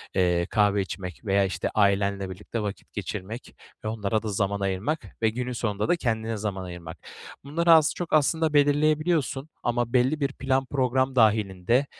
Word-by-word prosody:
eee, 90 -2 +2
kahve 105 -2 +3
içmek 95 +1 -7
veya, 100 -1 +3
işte, 95 - -2
ailenle 100 -1 +2
birlikte 105 +5 -5
vakit 105 -1 -6
geçirmek 105 +3 -6 0.3
ve - - -1
onlara 110 0 -1
da - - -4
zaman 100 0 -1
ayırmak 100 +11 -1 0.2
ve 110 - +4
günün 125 +3 -3
sonunda 105 -3 -2
da - - +5
kendine 115 -6 -2
zaman 100 -3 -3
ayırmak. 85 -3 -8 0.5
Bunları 165 +4 +2
az, 160 -2 +6
çok 175 - -5
aslında 155 +1 +3
belirleyebiliyorsun 150 0 +2
ama 120 0 -1
belli 130 +5 +3
bir 140 -1 -1
plan 135 0 0
program 130 0 0
dâhilinde 110 +1 +3
110 Hz, 160 wpm, -26 LUFS, 100-135 Hz, 0.5 s, az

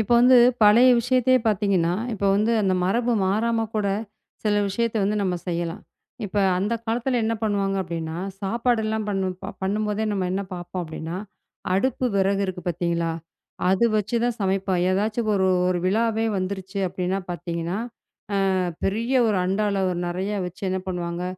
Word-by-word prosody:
இப்ப 220 - -3
வந்து 250 +1 +7 0.3
பழைய 235 +5 +7
விஷயத்தையே 255 +1 +3
பாத்தீங்கன்னா, 190 -5 +2 0.2
இப்ப 200 -1 -3
வந்து 215 +3 +2
அந்த 190 -1 +2
மரபு 235 +6 +1
மாறாம 225 +3 +1
கூட 210 -2 0 0.6
சில 210 -1 +2
விஷயத்த 230 +3 -1
வந்து 210 +2 0
நம்ம 185 -2 0
செய்யலாம். 170 +3 -3 0.4
இப்ப 200 +2 -3 0.2
அந்தக் 225 +4 -1
காலத்துல 245 +2 0
என்ன 225 +1 0
பண்ணுவாங்க 200 -2 0
அப்பிடின்னா, 165 -1 -5 0.2
சாப்பாடு 235 +4 0
எல்லாம் 220 -1 -2
பண்ணும் 190 -2 -1
ப 195 - -5
பண்ணும்போதே 210 +2 -1
நம்ம 190 -3 -1
என்ன 195 - -1
பார்ப்போம் 175 +1 -5
அப்பிடின்னா, 160 +1 -6 0.6
அடுப்பு 255 +6 0
விறகு 195 +1 +2
இருக்கு 180 -1 -5
பார்த்தீங்களா! 170 -1 -1 0.6
அது 190 +5 +3
வச்சுதான் 235 +3 0
சமைப்போம். 190 -1 0
ஏதாச்சு 210 +4 0
ஒரு 190 -2 +2 0.2
ஒரு 180 -1 +1
விழாவே 225 +2 +1
வந்துருச்சு 190 +1 -4
அப்பிடின்னா 185 +2 -2
பாத்தீங்கன்னா, 170 0 -3 0.8
ஆ - - +1 0.3
பெரிய 225 +6 0
ஒரு 210 -3 +1
அண்டால 200 +1 0
அ - - +1
ஒரு 175 - -3
நிறைய 185 +4 -2
வச்சு 180 +2 -9
என்ன 190 0 -1
பண்ணுவாங்க, 175 -1 -3
195 Hz, 155 wpm, -24 LUFS, 185-220 Hz, 0.8 s, வந்து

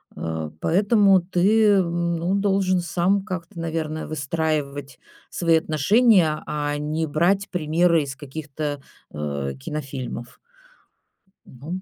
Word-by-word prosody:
Э, 80 -1 -4
поэтому 200 0 +4
ты, 195 +5 +2
э, 200 -2 +5
ну, 170 +1 -1
должен 195 -2 +1
сам 180 +3 +1
как-то, 180 -2 -6
наверное, 160 -1 -3
выстраивать 145 -3 -3 0.3
свои 165 -2 +2
отношения, 165 - +3
а 145 -1 -2
не 155 +2 -2
брать 185 +7 +1
примеры 165 -1 +2
из 135 -1 -6
каких-то, 145 0 -5 0.3
э, 70 -2 -3
кинофильмов. 130 - -6 1.1
Ну, 155 +9 -7
160 Hz, 105 wpm, -23 LUFS, 145-185 Hz, 1.1 s, э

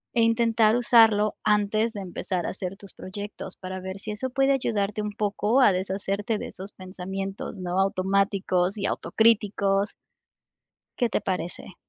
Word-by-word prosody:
E 235 - +4
intentar 230 -1 +3
usarlo 220 -3 +5
antes 210 +2 +2
de 205 - -5
empezar 180 -1 -3
a - - -2
hacer 190 0 -6
tus 200 -1 -12
proyectos 205 +2 -7
para 185 0 -6
ver 190 +1 -6
si 210 +2 -6
eso 260 +5 -3
puede 270 +2 +2
ayudarte 210 -5 -1
un 210 0 -3
poco 210 +3 +1
a 230 -6 +6
deshacerte 195 +3 -2
de - - -5
esos 190 +2 -9
pensamientos, 190 +1 -6
¿no?, 180 +1 -2
automáticos 195 0 +1
y 200 - -2
autocríticos. 200 0 +2 1.0
¿Qué 240 -2 +2
te - - 0
parece? 180 0 -4
200 Hz, 150 wpm, -26 LUFS, 190-220 Hz, 1.0 s, a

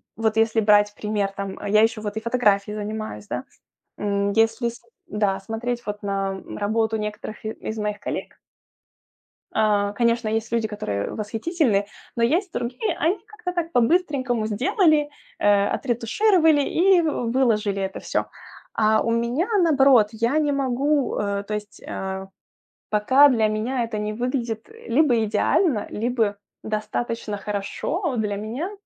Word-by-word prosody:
Вот 220 0 0
если 225 0 +3
брать 205 -1 +4
пример, 210 -2 -1
там, 195 -1 -5
а, 205 - -5
я 215 +1 +5
ещё 225 -1 +2
вот 210 0 -4
и - - -2
фотографией 210 -4 +1
занимаюсь, 210 - -5
да. - - -4 0.5
М, 200 -1 0
если 225 +2 +2
см 235 0 -14 0.2
да, 200 -2 0
смотреть 240 +4 -4
вот 210 0 -5
на 195 -1 -2 0.2
работу 220 +1 0
некоторых 210 0 -6
и 215 - -2
из 220 - -6
моих 210 -1 -2
коллег - - -5 1.2
э, 205 -2 +2
конечно, 235 -1 +1
есть 220 +1 -2
люди, 230 -2 +1
которые 105 - -3
восхитительны, 225 - 0 0.3
но 235 - 0
есть 340 - +1
другие. 245 - -2
Они 345 +6 +1
как-то 420 -4 -6
так 340 -2 -3
по-быстренькому 255 -4 +1
сделали, 295 - +2 0.3
э, 205 -1 +4
отретушировали 305 - +3
и 360 +5 +4
выложили 230 -8 +1
это 190 0 -4
всё. - - -1 0.5
А 215 0 +3
у 230 - -1
меня 235 +9 0 0.2
наоборот, 270 -9 +5
я 235 +7 +1
не 295 -2 +1
могу, 275 +1 0
э, 200 -1 -1
то 210 - -4
есть 210 -1 -7
Э, 190 0 -4 0.6
пока 260 +7 +5
для 225 -4 +3
меня 235 +4 -1
это 215 - -2
не 210 0 -2
выглядит, 240 - -3
э, 455 - -9
либо 300 -4 +5
идеально, 220 - +1
либо 225 -2 0 0.3
достаточно 215 0 -3
хорошо 250 - -2
для 210 -2 -1
меня. 240 - -4
225 Hz, 150 wpm, -23 LUFS, 210-260 Hz, 1.2 s, я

